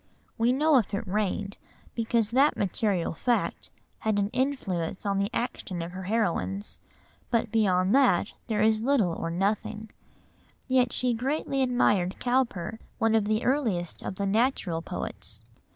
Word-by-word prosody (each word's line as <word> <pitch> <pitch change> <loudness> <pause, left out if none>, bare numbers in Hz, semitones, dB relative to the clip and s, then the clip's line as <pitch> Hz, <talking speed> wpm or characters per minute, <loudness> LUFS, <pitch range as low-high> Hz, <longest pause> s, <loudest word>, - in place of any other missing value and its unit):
We 230 +2 +2
know 295 +2 +4
if 210 -2 -2
it 200 - -3
rained, 200 0 -1 0.4
because 230 -1 +1
that 275 +5 +4
material 195 -3 0
fact 240 +8 -1 0.3
had 220 -1 0
an 200 0 +1
influence 220 -10 -2
on 200 -1 +1
the 200 +1 0
actions 190 -8 -3
of 170 - -6
her 185 +1 -7
heroines, 205 -1 -1 0.5
but 230 -2 0
beyond 190 -3 +2
that 255 -9 +3
there 215 -2 +1
is 220 0 +3
little 230 -9 +2
or 165 - -3
nothing; 205 +4 -2 0.8
yet 255 -2 +3
she 250 -1 +1
greatly 270 +3 -1
admired 210 -8 +2
Cowper, 235 -5 0 0.2
one 225 -1 +2
of 220 -2 +3
the 215 +2 0
earliest 225 - 0
of 190 - -5
the 200 - -2
"natural" 200 -5 +1
poets. 110 - -4
215 Hz, 150 wpm, -27 LUFS, 190-245 Hz, 0.8 s, know